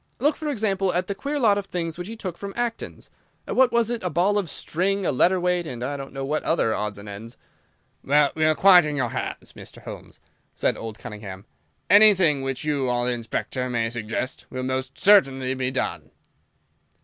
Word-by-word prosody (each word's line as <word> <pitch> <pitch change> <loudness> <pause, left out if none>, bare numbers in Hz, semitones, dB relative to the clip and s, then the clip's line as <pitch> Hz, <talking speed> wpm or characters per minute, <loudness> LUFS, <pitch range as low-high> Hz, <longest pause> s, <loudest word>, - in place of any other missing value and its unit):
Look, 295 +5 +2
for 310 - -6
example, 200 -7 0
at 180 +1 +1
the 200 - -3
queer 280 +8 -3
lot 210 -7 +3
of 200 - -7
things 165 -3 -3
which 175 +1 -6
he 225 - -7
took 185 -6 -5
from 200 +2 -7
Acton's—what 240 +2 -2
was 235 -1 +2
it?—a 225 -7 -2
ball 185 +6 +2
of 185 -5 -4
string, 190 +6 -1
a - - +2
letter 180 +8 +3
weight, 180 -1 0
and 120 -3 -6
I 140 +3 -2
don't 135 -1 -7
know 135 0 -4
what 150 +3 -1
other 115 -9 +1
odds 105 -1 -3
and 100 +1 -10
ends." 105 +3 -9 0.7
"Well, 145 +1 +3
we 155 - -1
are 155 0 +4
quite 185 -1 +7
in 150 -1 -2
your 125 -4 0
hands, - - -5
Mr. - - -12
Holmes," - - -10 0.4
said - - +1
old 110 -1 -7
Cunningham. 105 -3 -9 0.4
"Anything 190 -9 +6
which 135 -1 -3
you 145 -4 0
or 120 0 0
the 125 - 0
Inspector 125 +2 -3
may 115 -2 -1
suggest 120 +2 -4
will 130 0 -5
most 130 0 -3
certainly 135 -11 +4
be 130 -1 -2
done." 130 0 -3
155 Hz, 195 wpm, -24 LUFS, 125-195 Hz, 0.7 s, quite